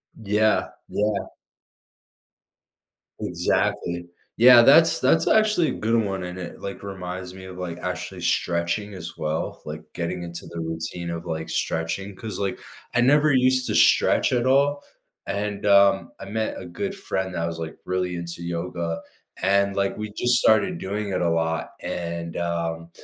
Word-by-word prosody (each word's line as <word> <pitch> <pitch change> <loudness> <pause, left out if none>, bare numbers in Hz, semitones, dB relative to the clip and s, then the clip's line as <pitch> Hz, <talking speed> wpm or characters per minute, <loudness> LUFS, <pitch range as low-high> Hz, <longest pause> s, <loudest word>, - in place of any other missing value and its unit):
Yeah, 110 0 +1 0.2
yeah. 105 -1 0 1.9
Exactly, 85 0 -1 0.3
yeah, 120 +1 +9
that's 160 +7 +6
that's 165 - +3
actually 215 -7 +4
a - - -1
good 115 +2 0
one 95 -2 -3
and 90 0 -6
it, 90 -2 -8
like, 100 - -6
reminds 90 -2 -6
me 95 0 -10
of, 95 -1 -9
like, 90 -2 -5
actually 90 -3 -5
stretching 85 +4 0
as 85 -3 -8
well, 80 0 -3
like 75 +1 -6
getting 90 +1 -3
into 85 0 -7
the 85 - -7
routine 80 +1 -4
of, 85 0 -5
like, 80 -1 -4
stretching, 90 +5 -2
'cause, 110 +2 -6
like, 100 -1 -2 0.3
I 125 - +3
never 145 +4 +4
used 130 0 +3
to - - -1
stretch - - +4
at 120 -1 +1
all, 140 +2 +3 0.4
and, 100 +1 -3
um, 100 -1 +5
I - - -7
met 110 +1 -2
a - - -8
good 195 - -4
friend 95 - -3
that 85 -1 -1
was, 85 0 -4
like, 80 -1 -6
really 90 -1 -1
into 85 0 -6
yoga, 85 -1 -3 0.4
and, 100 +1 +2
like, 100 0 0
we 105 0 -5
just 120 +3 +2
started 175 - +3
doing 105 - -3
it 95 - -1
a 85 - +2
lot 80 0 -1
and, 85 -1 -4
um, 85 -1 -2
95 Hz, 160 wpm, -24 LUFS, 85-110 Hz, 1.9 s, yeah